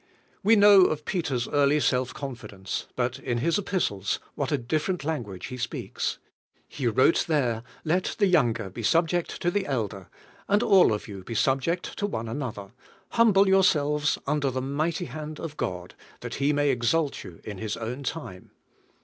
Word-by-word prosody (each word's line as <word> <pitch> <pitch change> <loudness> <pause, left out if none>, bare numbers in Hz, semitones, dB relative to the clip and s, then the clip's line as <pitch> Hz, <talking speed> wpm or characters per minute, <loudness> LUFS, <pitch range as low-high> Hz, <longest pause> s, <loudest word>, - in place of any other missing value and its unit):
We 220 +3 +5
know 200 -2 +8
of 150 -2 -1
Peter's 140 -10 -1
early 145 +1 +3
self 130 -3 +1
confidence; 105 -8 -6
but 125 +1 -1
in 120 -2 -2
his 165 - +1
epistles 130 - -1
what 140 0 -3
a 145 - +2
different 155 +7 -2
language 120 - -4
he 125 - -6
speaks! 120 - -3 0.5
He 130 - -3
wrote 130 +8 +3
there: 125 -8 +1 0.2
"Let 180 +4 0
the 205 - +4
younger 120 - +2
be 115 - -7
subject 165 +7 +1
to 175 - +2
the 200 +1 -1
elder, 105 -8 -3 0.4
and 205 +2 +3
all 195 - +6
of 105 - -3
you 100 -3 -8
be 115 - -6
subject 135 - 0
one 195 - -2
to 110 - -6
another; 110 -7 -5 0.4
humble 205 -4 +4
yourselves 150 -6 +3
under 145 -2 +1
the 130 0 -2
mighty 150 +5 -1
hand 155 +3 -7
of 160 -3 -6
God, 90 -6 -4 0.3
that - - -6
He 140 +2 +3
may 145 -1 +2
exalt 135 +5 0
you 85 - -11
in 105 -3 -7
His 110 -1 -3
own 115 +4 -5
time." 130 - -6
140 Hz, 170 wpm, -26 LUFS, 115-165 Hz, 0.5 s, know